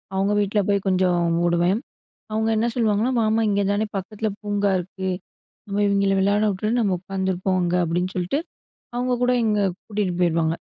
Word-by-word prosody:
அவங்க 195 +2 +1
வீட்ல 205 +1 0
போய் 200 -1 +1
கொஞ்சம் 185 -2 +2 0.3
ஓடுவேன். 175 +4 +2 0.5
அவங்க 220 +1 0
என்ன 225 +2 +2
சொல்லுவாங்கன்னா 225 +1 +1
"வாமா 220 +1 +2
இங்கே 200 0 +1
தானே 205 +2 +1
பக்கத்தில 215 +3 -3
பூங்கா 205 -1 0
இருக்கு. 190 +1 -5 0.6
நம்ம 200 0 -1
இவங்கெளை 200 -1 +2
விளையாடவுட்டு, 205 +1 +1
நம்ம 205 -5 +2
உட்காந்துருப்போம் 190 0 -1
அங்க." 175 0 0
அப்படின்னு 175 +3 -1
சொல்ட்டு, 180 +10 0 0.6
அவங்க 250 +1 0
கூட 250 - +3
இங்க 210 -1 +2 0.3
கூட்டிட்டு 205 -4 -1
போயிருவாங்க. 165 -2 +2
200 Hz, 150 wpm, -23 LUFS, 185-215 Hz, 0.6 s, கூட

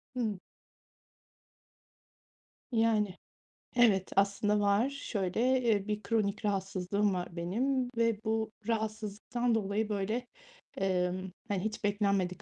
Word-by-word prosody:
Hımm. 215 -6 -1 2.3
Yani. 220 -4 +2 0.6
Evet, 205 -6 +4
aslında 200 +1 +3
var 205 +6 +3
şöyle, 250 -1 0
eee, 215 -4 +2
bir 210 0 -2
kronik 215 -1 0
rahatsızlığım 195 0 0
var 180 -1 -4
benim 245 +9 0
ve 230 -2 +2
bu 220 0 0 0.2
rahatsızlıktan 220 +2 -1
dolayı, 210 +1 0
böyle, 215 +5 -1 0.5
emm, 185 0 0 0.2
hani, 200 -3 0
hiç 220 0 -3
beklenmedik 200 -2 +1
210 Hz, 100 wpm, -31 LUFS, 195-225 Hz, 2.3 s, Evet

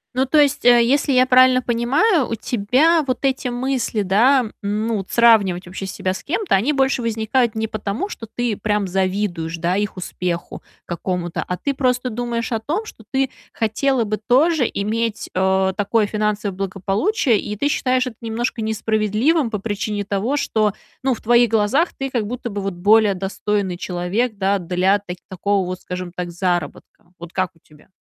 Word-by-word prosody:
Ну, 260 +1 +1
то 305 - +2
есть, 290 -1 +2
э, 240 -1 +6
если 280 +4 +2
я 255 -1 +5
правильно 255 0 +5
понимаю, 265 - +2
у 230 - -1
тебя 255 +10 +2
вот 255 - -1
эти 265 -1 0
мысли, 245 -3 -1
да, 240 +7 +4 0.2
ну, 210 +2 -1
от 190 - -8
сравнивать 205 -6 +4
вообще 190 +2 -6
себя 185 0 -2
с - - -8
кем-то, 370 +6 -1
они 215 +10 +3
больше 270 -2 +1
возникают 230 +1 0
не 220 0 -1
потому, 215 - -3
что 225 - -8
ты 240 0 -2
прям 210 -1 -1
завидуешь, 185 -3 -1
да, 170 +2 0
их 205 -1 -2
успеху 180 -1 -4 0.2
какому-то, 175 0 -3
а 180 - -4
ты 280 - -2
просто 250 -2 0
думаешь 235 +1 -3
о 225 - 0
том, 325 - -3
что 225 - -12
ты 265 -1 0 0.2
хотела 235 +3 +1
бы 215 0 -2
тоже 260 +5 +2
иметь, 220 +2 -2
э, 190 0 +2
такое 210 +2 +1
финансовое 210 -1 -2
благополучие. 195 - 0
И 210 - -5
ты 250 +8 0
считаешь 255 -3 +1
это 240 -4 -7
немножко 230 +1 -2
несправедливым 220 +6 +1
по 215 - -2
причине 205 0 -3
того, 205 +8 -1
что, 215 -7 +1 0.3
ну, 260 -1 +1
в - - -14
твоих 240 +1 +4
глазах 225 - +2
ты 270 -1 -3
как 230 -5 -1
будто 240 0 -5
бы 200 0 -4
вот 195 -1 -3
более 205 +2 +4
достойный 195 0 -2
человек, 185 +6 -2
да, 195 0 +1
для 185 +3 +1
так 180 -2 -8
такого 195 +1 0
вот, 185 0 -5
скажем 180 -1 -6
так, 180 -1 -4
заработка. 175 -1 -3
Вот 170 +1 -10
как 185 -1 0
у - - -25
тебя? 150 -1 -22
215 Hz, 180 wpm, -20 LUFS, 195-250 Hz, 0.3 s, э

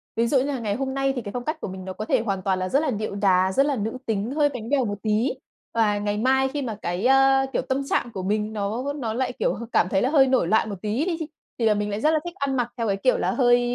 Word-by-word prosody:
Ví 230 +1 +2
dụ 270 - +3
như 255 - +3
là 280 -2 -2
ngày 210 -3 -2
hôm 265 +2 -3
nay 270 0 0
thì 245 - -2
cái 205 - -7
phong 245 +3 -4
cách 310 +1 -3
của - - -3
mình 185 -1 -7
nó 190 - -5
có 215 - -5
thể 220 - +2
hoàn 195 -4 -2
toàn 190 0 0
là 185 0 -2
rất 275 - +3
là 305 -3 0
điệu 215 -2 -3
đá, 190 -2 +3
rất 275 +9 +3
là 285 -1 +1
nữ 220 +1 -3
tính, 220 +1 -1
hơi 290 0 +2
bánh 240 -5 -7
bèo 275 -3 +2
một 205 -1 -3
tí 220 +4 +1 0.4
và 215 -3 +2
ngày 205 0 -1
mai 265 +4 +3
khi 285 +2 -3
mà 235 -5 -3
cái, 175 +5 -2
a, 270 +1 +5
kiểu, - - +1
tâm 265 +1 -1
trạng 240 - 0
của 190 -3 -4
mình 210 +2 -1
nó 220 +7 -2
nó 240 -7 -3
lại, 255 +2 -1
kiểu, - - +1
h - - -6
cảm 180 - +2
thấy 190 0 +1
là 255 - +2
hơi 275 -3 +5
nổi 255 -9 +2
loạn 220 +3 +2
một 200 - -4
tí 220 +8 -1
đi, 350 -3 -1 0.4
thì 230 - +1
là 220 - +5
mình 210 0 -2
lại 205 +1 -3
rất 305 - +4
là 315 - +2
thích 345 +1 -6
ăn 280 -7 -1
mặc 240 -1 -1
theo 230 -1 -1
cái 195 -1 0
kiểu 255 +6 +2
là - - 0
hơi 245 -2 +4
230 Hz, 315 wpm, -24 LUFS, 205-270 Hz, 0.4 s, a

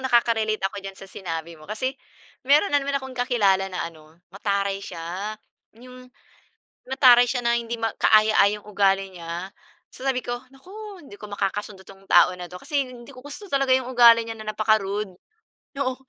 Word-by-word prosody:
nakaka-relate 230 -4 +2
ako 200 +1 -7
diyan 195 0 -8
sa 195 - -10
sinabi 170 -3 -6
mo 155 +3 -14
kasi 255 +5 -2 0.5
meron 290 +6 +3
na 285 - +4
naman 280 0 -1
akong 265 -1 -9
kakilala 205 -7 +2
na 180 -2 -3
ano, 160 -1 -15 0.2
mataray 200 -1 -1
siya, 185 +5 -6 0.4
'yong 250 +1 -13 0.8
mataray 250 -2 +6
siya 245 0 -2
na 235 0 +2
hindi 235 0 -4
ma 225 -1 -1
kaaya-ayang 215 -1 +4
ugali 195 -2 +1
niya. 175 +1 -6 0.4
So 260 - -9
sabi 255 -2 0
ko, 240 0 -3 0.2
"Naku! 390 +6 -11
hindi 205 -8 -13
ko 210 - -9
makakasundo 205 -1 -4
'tong 195 0 -16
tao 175 -1 +6
na 180 - -6
'to," 180 +1 -11
kasi 285 -4 -1
hindi 240 -2 -12
ko 255 +2 -13
gusto 375 +7 -9
talaga 275 -1 +3
'yong 255 -1 0
ugali 235 -2 +7
niya 225 0 -7
na 215 0 -5
napaka-rude. 210 -2 +1 0.7
Oo, 255 -1 -1
215 Hz, 175 wpm, -24 LUFS, 195-255 Hz, 0.8 s, ugali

